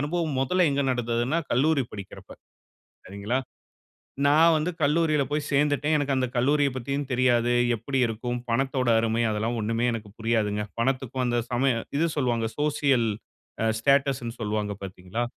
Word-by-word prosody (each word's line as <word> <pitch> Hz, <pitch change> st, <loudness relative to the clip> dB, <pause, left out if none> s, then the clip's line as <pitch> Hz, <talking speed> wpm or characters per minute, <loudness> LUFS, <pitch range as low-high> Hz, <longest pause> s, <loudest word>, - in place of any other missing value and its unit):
அனுபவம் 155 Hz, -1 st, -1 dB
மொதல்ல 180 Hz, +7 st, +2 dB
எங்க 140 Hz, 0 st, 0 dB
நடந்ததுன்னா, 120 Hz, +5 st, 0 dB
கல்லூரி 140 Hz, +2 st, +2 dB
படிக்குறப்ப. 100 Hz, -2 st, -10 dB, 0.8 s
சரிங்களா? 100 Hz, +7 st, -2 dB, 0.9 s
நான் 160 Hz, +3 st, +5 dB
வந்து 155 Hz, +4 st, -1 dB
கல்லூரியில 150 Hz, 0 st, +2 dB
போய் 150 Hz, 0 st, -1 dB
சேர்ந்துட்டேன். 145 Hz, +2 st, +2 dB
எனக்கு 140 Hz, -2 st, 0 dB
அந்த 130 Hz, -1 st, 0 dB
கல்லூரியப்பத்தியும் 140 Hz, +1 st, 0 dB
தெரியாது. 120 Hz, -1 st, +2 dB, 0.2 s
எப்படி 135 Hz, +5 st, -3 dB
இருக்கும்? 120 Hz, +2 st, -3 dB
பணத்தோட 130 Hz, +1 st, 0 dB
அருமை 115 Hz, +1 st, 0 dB
அதெல்லாம் 110 Hz, +3 st, -1 dB
ஒன்னுமே 115 Hz, +3 st, 0 dB
எனக்கு 110 Hz, -2 st, -7 dB
புரியாதுங்க. 110 Hz, -2 st, 0 dB, 0.2 s
பணத்துக்கும் 130 Hz, 0 st, -1 dB
அந்த 120 Hz, 0 st, +1 dB
சமயம் 120 Hz, -2 st, +1 dB
இது 165 Hz, -, +2 dB
சொல்லுவாங்க 120 Hz, -4 st, 0 dB
சோசியல் 140 Hz, -5 st, +2 dB, 0.6 s
அ -, -, +2 dB
ஸ்டேட்டஸ் 140 Hz, +1 st, +2 dB
ன்னு 115 Hz, +1 st, -6 dB
சொல்லுவாங்க 105 Hz, -1 st, -2 dB
பார்த்தீங்களா? 95 Hz, +4 st, -5 dB
130 Hz, 135 wpm, -26 LUFS, 115-145 Hz, 0.9 s, நான்